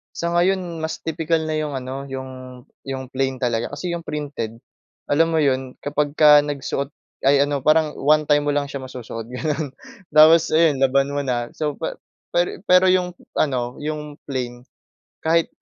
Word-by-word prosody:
Sa 170 - -2
ngayon, 175 -2 +1
mas 160 - -3
tipikal 160 0 -1
na 155 - -1
'yong 155 -1 -2
ano, 135 0 -5
'yong 130 -1 -6 0.5
'yong 135 -1 -5
plain 130 0 -2
talaga. 120 -2 -1
Kasi 170 +4 -3
'yong 170 - -6
printed, 140 -8 -5 0.5
alam 165 +3 +3
mo 160 - +2
'yon, 130 -3 0
kapagka 150 0 +4
nagsuot 140 -1 -3 0.3
ay, 140 +1 +5
ano, 145 -2 -2
parang 155 0 +3
one 150 +2 +4
time 145 -1 +4
mo 145 - +1
lang 145 0 0
siya 140 -1 -6
masusuot, 120 -3 -7
gano’n, 150 +3 -2 0.4
tapos 155 +2 +6
ayon, 155 -4 +3
laban 135 +1 +2
mo 145 - 0
na. 120 -3 -1
So, 150 -2 -3
pa 160 - -3 0.4
pero 175 +1 +1
pero 180 +1 +6
'yong 180 -1 +1 0.3
ano, 125 -4 0
'yong 150 -1 -5
plain, 125 -3 -4 0.6
kahit 165 +1 +3
145 Hz, 165 wpm, -22 LUFS, 130-155 Hz, 0.6 s, tapos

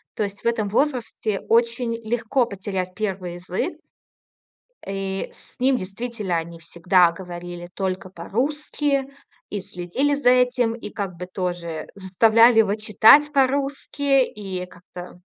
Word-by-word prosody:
То 215 - -1
есть 200 0 -6
в - - -1
этом 220 -3 0
возрасте 230 -5 -1
очень 235 +1 +2 0.2
легко 240 +2 +1
потерять 190 -3 -4
первый 190 -5 -3
язык. 185 - -3 1.1
И 195 0 -3
с - - -16
ним 260 0 +3
действительно 205 -2 -4
они 165 0 -6
всегда 170 +1 +3
говорили 175 -1 -8
только 190 -1 -3
по-русски, 275 - -1 0.5
и 205 - -3
следили 185 +12 -1
за 280 -3 +3
этим, 250 -2 +3
и 210 -3 -7
как 195 -4 -5
бы 180 +1 -6
тоже 175 -3 -4
заставляли 225 +5 +5
его 205 -1 +2
читать 225 +7 +6
по-русски. 275 0 +1
И 190 -5 -6
как-то, 180 0 -12
205 Hz, 130 wpm, -23 LUFS, 180-245 Hz, 1.1 s, читать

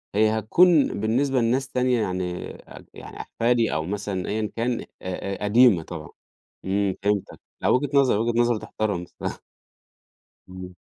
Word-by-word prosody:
هي 110 +1 +3
هتكون 160 - +4
بالنسبة 130 +5 +1
لناس 125 +4 +1
تانية 125 -2 +1
يعني 90 -2 -3
أج - - -14
يعني - - -11
أحفادي 115 0 0
أو 80 0 -1
مثلًا 100 0 -3
أيًا 110 0 -2
كان 120 +1 -1
أ - - -9 0.2
أ 95 +2 -5
قديمة 105 -4 +5
طبعًا - - -8 0.6
إمم، 95 0 0
فهمتك 100 -1 -1 0.2
لأ - - 0
وجهة 135 +2 +2
نَظَر 135 -6 +4
وجهة 115 +1 0
نَظَر 120 -1 +2
تُحتَرم 105 -4 -3
بصراحة. - - -7 1.1
إمم. 90 0 -9
110 Hz, 150 wpm, -24 LUFS, 95-125 Hz, 1.1 s, قديمة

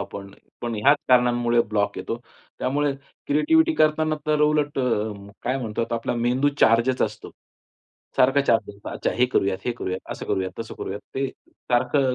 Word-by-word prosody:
आपण 100 0 -7 0.3
पण 120 -1 -3
ह्याच 135 +8 +4
कारणांमुळे 120 -1 +4
ब्लॉक 105 -1 0
येतो. 115 - -3 0.4
त्यामुळे 145 +2 0 0.3
क्रिएटिव्हिटी 320 - +3
करतांना 155 - +2
तर 150 -1 +2
उलट 150 -1 +1
अ, 110 -4 0 0.3
काय 130 +2 -1
म्हणतो 115 -2 -2
आपला 115 +1 -2
मेंदू 125 +4 +2
चार्जच 120 +3 +4
असतो. - - -4 0.9
सारखा 135 +2 +4
चार्ज 115 -5 +2
असतो. 100 - -10
अच्छा, - - -2
हे 125 +1 +3
करूयात, 95 -6 0
हे 120 - 0
करूयात, 95 -5 -4
असं - - -8
करूया, 95 -1 0
तसं 115 -1 -6
करूयात. 100 +2 -5
ते 135 +1 0 0.2
सारखं 130 +2 +1
125 Hz, 160 wpm, -24 LUFS, 115-145 Hz, 0.9 s, ह्याच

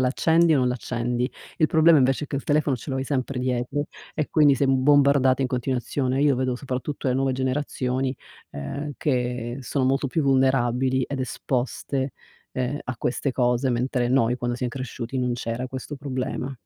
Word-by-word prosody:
l'accendi 160 +5 +3
o - - +3
non 125 -1 +2
l'accendi. 125 0 -2 0.3
Il 155 - +4
problema 160 +1 +5
invece 135 +3 +2
è - - -9
che 140 - -3
il 135 - -4
telefono 145 -3 +2
ce 135 - -8
lo 135 - -1
hai 130 - -2
sempre 130 -1 -2
dietro, 130 +3 -1 0.3
e 155 -2 -1
quindi 150 -3 +5
sei 140 +1 +1
bombardata 135 0 +4
in 130 - +1
continuazione. 130 +1 -1
Io 145 -3 +4
vedo 130 -1 0
soprattutto 130 +1 -3
le 125 - +1
nuove 135 0 +1
generazioni, 130 0 -1 0.4
ehm, 140 - -5
che 125 -3 -1
sono 130 +1 -1
molto 135 +1 +1
più 160 - 0
vulnerabili 130 -1 +2
ed 140 -2 -4
esposte, 130 +1 -2 0.4
ehm, 130 +3 -2
a 130 -2 -4
queste 130 +2 -1
cose, 125 +1 +1
mentre 120 0 0
noi 125 -1 +2
quando 120 -1 -2
siam 125 -1 -2
cresciuti, 130 0 -5
non 125 -1 0
c'era 120 +1 -3
questo 130 +3 -6
problema. 130 -1 -4
130 Hz, 175 wpm, -24 LUFS, 125-140 Hz, 0.4 s, problema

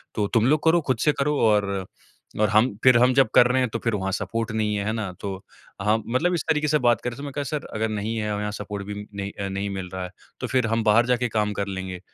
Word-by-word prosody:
तो 105 -2 0
तुम 115 -1 +4
लोग 150 +2 +2
करो, 165 +1 +4
खुद 130 -5 -1
से - - +7
करो 150 +1 +1
और 105 -2 +2 0.7
अ, 110 - +4
हम 110 +3 +5 0.2
फिर 130 -2 +7
हम 125 +2 +4
जब 135 -1 +4
कर 120 - +8
रहे 125 +1 +1
हैं 125 - +2
तो 115 - -1
फिर 115 - 0
वहाँ 95 -1 -2
सपोर्ट 110 +4 -2
नहीं 105 -1 0
है, 100 0 -2
है 110 - 0
ना? 110 -4 -3
तो - - -5 0.5
हम 105 +2 +1
मतलब 175 +7 +2
इस 170 - -1
तरीके 150 -1 +2
से 150 - +3
बात 120 -4 +2
कर 125 - -2
रहे 120 - -8
हैं - - -16
तो 140 - -8
मैंने 145 - -5
कहा 145 - -2
सर 145 +1 -4
अगर 110 +1 0
नहीं 110 +1 -3
है 105 -1 -2
और 105 - -2
यहाँ 105 0 -2
सपोर्ट 100 -1 -6
भी 105 - -5 0.2
नहीं 100 0 -4
अ, 100 - -2
नहीं 100 +1 -3
मिल 95 -2 -5
रहा 95 - -4
है, 90 - -5 0.3
तो - - -3
फिर 130 -3 +1
हम 115 0 0
बाहर 110 +2 +4
जाके 125 0 +1
काम 105 -1 0
कर 100 0 -3
लेंगे। 95 -1 -5
110 Hz, 290 wpm, -24 LUFS, 100-125 Hz, 0.7 s, कर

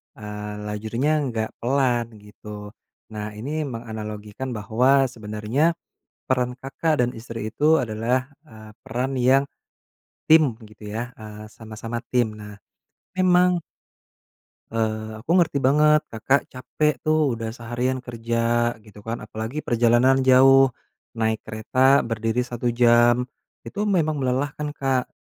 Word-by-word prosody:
eee, 105 -2 -7 0.2
lajurnya 115 +9 0
enggak 115 -6 -2
pelan 120 -3 0
gitu. 105 0 -10 0.4
Nah, 105 0 -6
ini 145 +7 -3
menganalogikan 110 0 -6
bahwa 125 +6 +3
sebenarnya 110 +9 -1 0.5
peran 125 -1 +1
Kakak 145 +3 -1
dan 120 - +2
istri 115 -1 -6
itu 150 +6 +3
adalah, 120 +4 -1 0.2
eee, 110 -5 -13
peran 130 +4 -2
yang 130 +2 +4 0.8
tim, 155 -8 +5
gitu 105 0 -11
ya, 120 +3 -5
eee, 110 0 -10
sama-sama 115 +2 -7
tim. 120 -4 +1
Nah, 105 -1 -11 0.6
memang 180 -1 +4 1.1
eee, 110 -1 -2
aku 120 +8 -9
ngerti 165 -5 +3
banget, 150 +3 +4
Kakak 125 +5 0
capek 150 +4 -1
tuh, 155 -4 +2
udah 115 -1 -4
seharian 120 +3 -2
kerja, 120 -1 -1
gitu 105 -1 -16
kan. 115 +2 -4
Apalagi 110 +7 -6
perjalanan 120 +3 +3
jauh, 135 +1 +6 0.5
naik 110 -1 0
kereta 130 +5 +2
berdiri 115 0 -2
1 120 0 -2
jam, 120 +1 +4 0.4
itu 205 - -4
memang 160 -8 +1
melelahkan, 140 +3 -1
Kak. 135 -3 -1
120 Hz, 120 wpm, -23 LUFS, 110-135 Hz, 1.1 s, jauh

